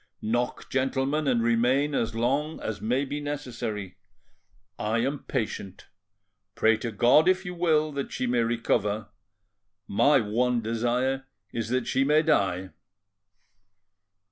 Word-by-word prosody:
Knock, 120 +3 -2
gentlemen, 135 +3 0
and 120 -3 +2
remain 125 +5 +2
as 115 -4 -1
long 140 +7 0
as 105 -2 -5
may 125 +5 0
be 145 +2 -4
necessary. 120 -10 -5 0.8
I 110 +2 0
am 135 +3 -2
patient. 105 -6 -4 0.7
Pray 110 0 +4
to 115 +1 -4
God, 125 - +5
if 185 +1 +1
you 180 - -4
will, 160 -3 +2
that 140 -1 -4
she - - -2
may 120 -1 +1
recover; 110 -2 0 0.8
my 120 +8 +4
one 120 +3 +1
desire 120 +4 -1 0.3
is 115 -1 -3
that 125 0 0
she 135 - +1
may 150 +3 +3
die." 95 - +1
125 Hz, 130 wpm, -27 LUFS, 115-140 Hz, 0.8 s, God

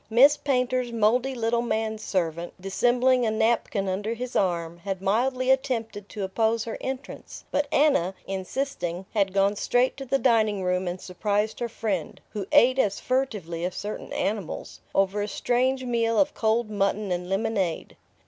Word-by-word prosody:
Miss 265 +6 +7
Painter's 255 -3 0
mouldy 235 +4 +2
little 235 0 +1
man 220 -1 -1
servant, 170 -5 -2
dissembling 245 +6 +2
a 225 - +2
napkin 220 -2 +1
under 205 +5 -2
his 250 +1 -6
arm, 170 -3 0
had 195 +1 -4
mildly 255 +7 +1
attempted 230 -6 -1
to 210 - -5
oppose 220 +3 +1
her 225 - -5
entrance; 265 +1 -6
but 290 0 +1
Anna, 275 - +3
insisting, 190 -2 -3
had 200 -3 +2
gone 195 +1 +2
straight 245 +5 +1
to 270 - -6
the 275 +2 +1
dining 220 -6 +2
room 180 0 0
and 175 +1 -3
surprised 205 +4 -1
her 240 - -2
friend 205 -7 -3
who 200 -3 -4
ate 255 +2 +5
as 200 -5 +1
furtively 210 -11 -2
as 180 0 -2
certain 210 +1 -5
animals 200 -5 -3 0.2
over 195 +1 +2
a 205 - -1
strange 255 +4 0
meal 230 -2 +1
of 290 0 +3
cold 220 0 +1
mutton 200 -1 0
and 180 0 -2
lemonade. 195 -4 -1
220 Hz, 160 wpm, -26 LUFS, 195-245 Hz, 0.2 s, Miss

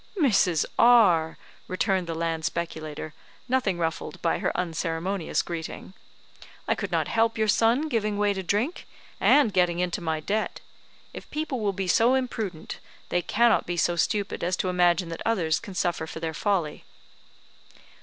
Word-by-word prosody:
"Mrs. 195 - +3
R 190 -10 +5
," - - -28
returned 185 -1 0
the 165 - -3
land 165 -1 -2
speculator, 155 -2 -4 0.3
nothing 245 -8 +1
ruffled 165 -2 -3
by 165 - +1
her - - 0
unceremonious 170 +1 -2
greeting, 170 +2 -6 0.7
"I - - +3
could - - -5
not - - +1
help 225 0 +1
your 220 0 +1
son 230 +8 +3
giving 215 -6 -1
way 205 0 +2
to 190 - -4
drink, 210 - -1 0.3
and 280 -8 +4
getting 180 -2 +2
into 180 0 -1
my 160 -2 -1
debt. 210 +7 -2 0.5
If - - -10
people 300 -4 -3
will 210 -2 0
be 190 0 -3
so 235 +8 +4
imprudent, 220 -10 -4 0.3
they 175 - +1
cannot 235 +5 +2
be 175 0 -2
so 175 +1 +2
stupid 200 +3 -1
as 180 +1 0
to 185 - -1
imagine 175 -1 +2
that 165 - -6
others 175 -8 +1
can 200 -5 -10
suffer 175 -3 -1
for 160 - -7
their 160 -1 -3
folly." 175 -4 -1
185 Hz, 165 wpm, -26 LUFS, 165-220 Hz, 0.7 s, R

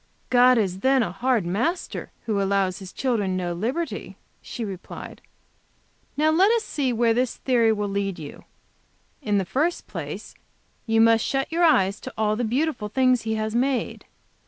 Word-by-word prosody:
"God 250 0 +6
is 190 -4 0
then 265 +2 +3
a 175 - -3
hard 240 -1 0
Master, 240 - -2 0.2
who 210 -3 0
allows 195 -2 0
his 190 -2 -9
children 210 -8 -1
no 175 -1 -2
liberty," 250 - -3 0.2
she 235 - -6
replied. 190 -3 -8 1.0
"Now 310 +1 +3
let 380 +7 +4
us 460 -1 +1
see 280 -10 -1
where 230 -1 +2
this 245 +1 -1
theory 235 -4 +2
will 210 -1 -1
lead 195 -1 -2
you. 150 -3 -9 0.8
In 210 -6 0
the 195 - 0
first 295 - -1
place - - -7 0.5
you 225 0 +3
must 225 0 +5
shut 270 +2 -1
your 340 +2 +1
eyes 200 - +3
to - - -8
all 215 -1 +1
the 245 - -2
beautiful 240 -1 -1
things 255 +1 +3
He 220 0 -2
has 215 0 -2
made. 255 +2 -1
225 Hz, 170 wpm, -24 LUFS, 200-260 Hz, 1.0 s, God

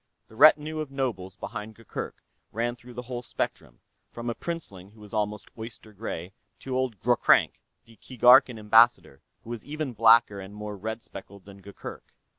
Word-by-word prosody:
The 110 - -16
retinue 155 +3 +5
of 155 -2 -4
nobles 115 -9 -3
behind 110 0 -7
Gurgurk 115 -3 -7 0.3
ran 120 +2 -2
through 125 0 -14
the 125 - -5
whole 120 0 -5
spectrum, 65 - -5 0.3
from 120 0 -5
a - - -3
princeling 105 - -7
who 110 +2 -21
was 105 0 -14
almost 105 -1 -2
oyster 110 -1 -9
gray 95 -3 -6 0.3
to 130 -1 -4
old 130 -6 -1
Ghroghrank, - - +3 0.2
the 115 -1 -19
Keegarkan 125 +1 +5
Ambassador, 110 - +4 0.2
who 115 - -9
was 120 -3 -6
even 150 -3 -4
blacker 115 -2 +5
and 95 +1 -10
more 105 0 -6
red 110 +3 -5
speckled 100 0 -12
than 100 -1 -13
Gurgurk. 100 +1 -10
115 Hz, 170 wpm, -27 LUFS, 105-125 Hz, 0.3 s, retinue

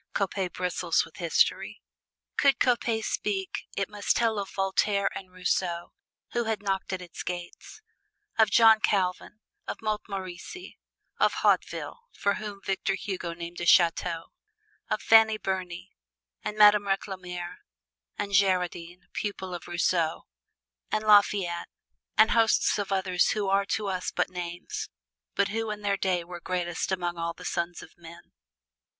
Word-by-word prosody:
Coppet 190 -2 -1
bristles 180 -1 0
with - - -16
history. - - +1 0.6
Could 280 -2 +4
Coppet 235 -3 +1
speak 195 -3 -2
it 195 -1 0
must 205 -1 0
tell 225 -3 +1
of 195 - -4
Voltaire 195 +1 +1
and 185 -1 -8
Rousseau, 180 -1 -1 0.4
who 240 -1 0
had 220 -2 -2
knocked 195 -1 -1
at 185 -1 -3
its 175 -2 -8
gates; 175 - -7 0.5
of 220 -2 +4
John 225 +1 +7
Calvin; 195 +1 0 0.3
of - - -4
Montmorency; 205 - -5 0.4
of - - +4
Hautville - - +1
(for 200 - +1
whom 205 -2 -6
Victor 195 0 -1
Hugo 180 -4 -4
named 170 0 -7
a 175 - -2
chateau); 170 -1 +3 0.6
of - - -1
Fanny 220 -1 +6
Burney 185 - -4 0.5
and 210 - -4
Madame 210 -1 +7
Recamier 180 -3 -3 0.6
and 200 - -3
Girardin 180 -2 +1
(pupil 190 -3 -4
of 175 - -7
Rousseau); 170 -2 0 0.7
and 215 - 0
Lafayette 200 -4 +3 0.5
and 220 - +6
hosts 225 -2 +3
of 200 -1 -3
others 185 -2 +2
who 210 -2 -1
are 195 +1 +3
to 215 - -1
us 185 -2 -2
but - - -1
names, 175 -1 -5 0.5
but 200 - +2
who 225 +1 -2
in 210 0 -4
their 200 -1 +1
day 185 -3 0
were 175 0 -8
greatest 175 0 -2
among 175 -2 -2
all 165 0 -2
the - - -12
sons 170 0 -2
of - - -14
men. 170 0 -14
190 Hz, 145 wpm, -28 LUFS, 175-210 Hz, 0.7 s, John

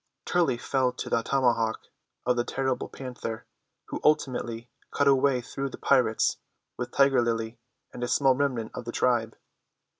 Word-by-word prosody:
Turley 165 -9 +2
fell 130 +1 +1
to - - -6
the - - +3
tomahawk 120 -3 +1 0.4
of 125 - +3
the 120 - +1
terrible 130 +1 -2
Panther, 120 -4 -6 0.4
who - - -4
ultimately 120 -5 +1 0.2
cut 145 - +1
a 140 - +7
way 135 -1 +2
through 135 +3 -4
the - - -9
pirates 125 -5 +2 0.4
with - - -4
Tiger 135 -2 +4
Lily 115 -1 -2 0.3
and 120 - -6
a - - 0
small 135 +1 +4
remnant 130 -5 -1
of 120 - -6
the 120 - -4
tribe. 120 -3 +1
125 Hz, 160 wpm, -27 LUFS, 115-135 Hz, 0.4 s, a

